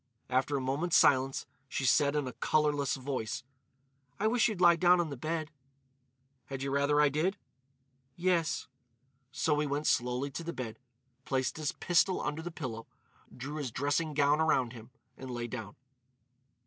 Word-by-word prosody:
After 135 Hz, +3 st, +1 dB
a -, -, -2 dB
moment's 145 Hz, +7 st, +1 dB
silence 135 Hz, -1 st, +3 dB, 0.2 s
she 130 Hz, -, -2 dB
said 140 Hz, +3 st, +4 dB
in 145 Hz, -3 st, 0 dB
a 125 Hz, -, -5 dB
colourless 145 Hz, +3 st, +1 dB
voice: 130 Hz, -4 st, -4 dB, 0.8 s
"I 205 Hz, -, 0 dB
wish 230 Hz, +1 st, +4 dB
you'd 215 Hz, -5 st, -3 dB
lie 175 Hz, -1 st, +7 dB
down 180 Hz, +1 st, +5 dB
on 165 Hz, -3 st, -1 dB
the -, -, -4 dB
bed." 155 Hz, +3 st, -3 dB, 1.0 s
"Had 135 Hz, -1 st, -5 dB
you 135 Hz, -, -2 dB
rather 140 Hz, +1 st, +2 dB
I 150 Hz, -, +6 dB
did?" 160 Hz, +8 st, 0 dB, 0.8 s
"Yes." 175 Hz, -2 st, +1 dB, 0.7 s
So 150 Hz, +1 st, +1 dB
he 150 Hz, -, 0 dB
went 145 Hz, +2 st, -2 dB
slowly 125 Hz, +3 st, +1 dB
to 165 Hz, -, -5 dB
the 170 Hz, +1 st, -4 dB
bed, 120 Hz, -2 st, -6 dB, 0.4 s
placed 130 Hz, 0 st, -1 dB
his 155 Hz, -2 st, -2 dB
pistol 180 Hz, +1 st, +2 dB
under 150 Hz, +2 st, -3 dB
the 175 Hz, -, -5 dB
pillow, 125 Hz, -9 st, -6 dB, 0.5 s
drew 140 Hz, +5 st, -5 dB
his 145 Hz, -4 st, -3 dB
dressing 145 Hz, +5 st, -1 dB
gown 145 Hz, +1 st, +3 dB
around 130 Hz, -6 st, +2 dB
him, 115 Hz, -1 st, -11 dB, 0.3 s
and 130 Hz, -, -8 dB
lay 120 Hz, -1 st, -3 dB
down. 110 Hz, -4 st, -6 dB
145 Hz, 165 wpm, -31 LUFS, 130-160 Hz, 1.0 s, lie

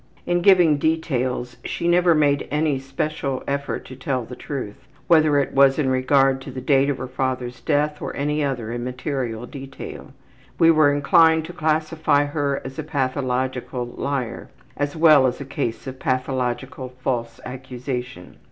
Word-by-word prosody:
In 175 Hz, 0 st, +1 dB
giving 175 Hz, -6 st, +5 dB
details 130 Hz, -6 st, -1 dB
she 170 Hz, -, -3 dB
never 175 Hz, -1 st, +4 dB
made 145 Hz, -2 st, +2 dB
any 150 Hz, -2 st, 0 dB
special 135 Hz, 0 st, -3 dB
effort 140 Hz, 0 st, -3 dB
to 130 Hz, -, -10 dB
tell 130 Hz, -2 st, -2 dB
the 125 Hz, -, -9 dB
truth, 135 Hz, -3 st, -7 dB, 0.2 s
whether 155 Hz, -3 st, +4 dB
it 140 Hz, -, 0 dB
was 135 Hz, 0 st, +5 dB
in 145 Hz, -4 st, +1 dB
regard 135 Hz, +1 st, +3 dB
to 135 Hz, -, -9 dB
the 130 Hz, 0 st, -6 dB
date 135 Hz, +1 st, +3 dB
of 140 Hz, -, -1 dB
her 130 Hz, -, -5 dB
father's 130 Hz, -1 st, -3 dB
death 150 Hz, -1 st, 0 dB
or -, -, -3 dB
any 150 Hz, +1 st, 0 dB
other 125 Hz, -5 st, -2 dB
immaterial 125 Hz, -1 st, -3 dB
detail. 135 Hz, +1 st, -9 dB, 0.5 s
We 165 Hz, -1 st, +6 dB
were 155 Hz, -3 st, +5 dB
inclined 160 Hz, +3 st, +4 dB
to 175 Hz, -, -8 dB
classify 155 Hz, -2 st, +1 dB
her 145 Hz, -1 st, -2 dB
as 135 Hz, +2 st, -7 dB
a -, -, -2 dB
pathological 130 Hz, -3 st, -2 dB
liar, 125 Hz, 0 st, -4 dB, 0.3 s
as 145 Hz, +2 st, -2 dB
well 155 Hz, -5 st, +6 dB
as 125 Hz, -, -3 dB
a 140 Hz, -, -6 dB
case 130 Hz, -4 st, -3 dB
of 130 Hz, -1 st, -7 dB
pathological 130 Hz, +2 st, -2 dB
false 120 Hz, -2 st, -2 dB
accusation. 125 Hz, -5 st, -6 dB
135 Hz, 160 wpm, -22 LUFS, 130-150 Hz, 0.5 s, We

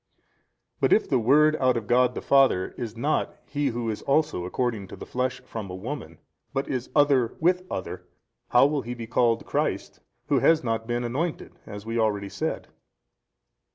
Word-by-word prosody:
A. -, -, -42 dB, 0.6 s
But -, -, +3 dB
if 220 Hz, -, +3 dB
the 130 Hz, -, +2 dB
Word 150 Hz, +6 st, +4 dB
out 130 Hz, -3 st, +2 dB
of 115 Hz, -, -4 dB
God 125 Hz, +2 st, +3 dB
the -, -, -5 dB
Father 135 Hz, -9 st, +4 dB
is 115 Hz, -2 st, -6 dB
not 145 Hz, +6 st, 0 dB
He 145 Hz, 0 st, -1 dB
Who 120 Hz, -2 st, -2 dB
is 105 Hz, -, -6 dB
also 145 Hz, -, +1 dB
according 110 Hz, 0 st, -2 dB
to -, -, -9 dB
the -, -, -9 dB
flesh 130 Hz, +1 st, -2 dB
from 110 Hz, -4 st, -7 dB
a 90 Hz, -, -6 dB
woman, 95 Hz, -, -6 dB, 0.4 s
but 135 Hz, -, -1 dB
is 130 Hz, -2 st, -3 dB
Other 140 Hz, -5 st, +3 dB
with 180 Hz, +3 st, +3 dB
other 95 Hz, -, -4 dB
32, -, -, -29 dB, 0.4 s
how 125 Hz, +2 st, +6 dB
will 145 Hz, 0 st, +1 dB
ho 120 Hz, 0 st, -6 dB
be 115 Hz, -1 st, -6 dB
called 115 Hz, 0 st, +1 dB
Christ -, -, -2 dB, 0.3 s
who -, -, +2 dB
has 165 Hz, -3 st, +4 dB
not 115 Hz, -1 st, -2 dB
been 120 Hz, 0 st, -1 dB
anointed 145 Hz, +8 st, -3 dB
as 105 Hz, 0 st, -8 dB
we 115 Hz, +1 st, -2 dB
already 105 Hz, -3 st, 0 dB
said? -, -, -4 dB
120 Hz, 190 wpm, -26 LUFS, 115-140 Hz, 0.6 s, how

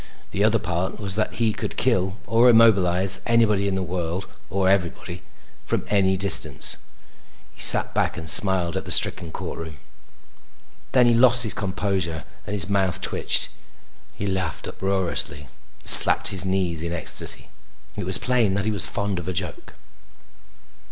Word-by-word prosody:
The 100 Hz, -, -3 dB
other 110 Hz, +1 st, +1 dB
part 90 Hz, -2 st, -5 dB
was 100 Hz, -3 st, -1 dB
that 110 Hz, +2 st, -3 dB
he 115 Hz, -2 st, -2 dB
could -, -, -8 dB
kill 95 Hz, +2 st, -2 dB
or 115 Hz, +2 st, +2 dB
immobilize 95 Hz, -5 st, +2 dB
anybody 105 Hz, -4 st, 0 dB
in 95 Hz, -, -3 dB
the 95 Hz, -, -4 dB
world 90 Hz, +1 st, -6 dB, 0.2 s
or 95 Hz, -1 st, -2 dB
everybody 90 Hz, -2 st, -3 dB, 0.4 s
from -, -, -5 dB
any 95 Hz, -2 st, 0 dB
distance. 100 Hz, +1 st, +1 dB, 0.8 s
He -, -, -11 dB
sat -, -, +5 dB
back -, -, -3 dB
and 80 Hz, -1 st, -9 dB
smiled 90 Hz, 0 st, +2 dB
at -, -, -6 dB
the -, -, -7 dB
stricken 85 Hz, -2 st, +1 dB
courtroom. 80 Hz, -2 st, -9 dB, 1.2 s
Then 125 Hz, -2 st, +3 dB
he 120 Hz, -, +2 dB
lost 125 Hz, +1 st, +4 dB
his 110 Hz, -, -3 dB
composure 95 Hz, -5 st, -5 dB, 0.2 s
and 105 Hz, -, -6 dB
his 90 Hz, -5 st, +4 dB
mouth 95 Hz, -3 st, -2 dB
twitched. -, -, -1 dB, 0.7 s
He 100 Hz, -, -7 dB
laughed 95 Hz, -5 st, -5 dB
uproariously 95 Hz, -6 st, -2 dB
and 65 Hz, -3 st, -22 dB
slapped -, -, +9 dB
his 95 Hz, -2 st, +6 dB
knees 95 Hz, -4 st, -3 dB
in 85 Hz, 0 st, -6 dB
ecstasy. 85 Hz, -, +1 dB, 0.5 s
It -, -, -7 dB
was -, -, +3 dB
plain 120 Hz, -6 st, -1 dB
that 100 Hz, 0 st, -4 dB
he 110 Hz, -, -2 dB
was 100 Hz, -4 st, 0 dB
fond 100 Hz, -2 st, -4 dB
of 85 Hz, -, -10 dB
a 95 Hz, -, -4 dB
joke. 90 Hz, 0 st, -8 dB
95 Hz, 160 wpm, -21 LUFS, 90-105 Hz, 1.2 s, slapped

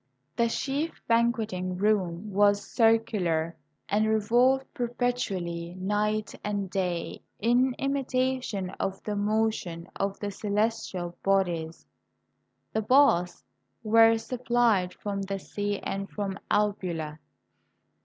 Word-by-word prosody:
The 235 Hz, -, +3 dB
chief 280 Hz, +7 st, -2 dB
banqueting 220 Hz, -6 st, +1 dB
room 195 Hz, -1 st, 0 dB
was 205 Hz, 0 st, +3 dB
circular, 205 Hz, -8 st, +2 dB, 0.3 s
and 215 Hz, +2 st, +2 dB
re 220 Hz, -, +3 dB
volved 250 Hz, +5 st, +3 dB
perpetually, 195 Hz, -9 st, -2 dB
night 210 Hz, +3 st, -1 dB
and 200 Hz, -2 st, -2 dB
day, 180 Hz, -3 st, -2 dB, 0.2 s
in 245 Hz, +3 st, +3 dB
imitation 255 Hz, -7 st, -1 dB
of 195 Hz, 0 st, -3 dB
the 210 Hz, -, -3 dB
mo 215 Hz, +2 st, +2 dB
tion 170 Hz, -4 st, -7 dB
of 195 Hz, 0 st, -2 dB
the 205 Hz, -1 st, -3 dB
celestial 205 Hz, -4 st, -2 dB
bodies. 175 Hz, -5 st, 0 dB, 0.9 s
The 220 Hz, -, +1 dB
baths 215 Hz, -8 st, +3 dB, 0.4 s
were 225 Hz, +1 st, +6 dB
supplied 235 Hz, -6 st, +1 dB
from 200 Hz, -1 st, -4 dB
the 195 Hz, 0 st, -3 dB
sea 205 Hz, +1 st, -3 dB
and 195 Hz, 0 st, -4 dB
from 200 Hz, -2 st, -4 dB
Albula. 175 Hz, -7 st, -1 dB
205 Hz, 110 wpm, -28 LUFS, 185-230 Hz, 0.9 s, were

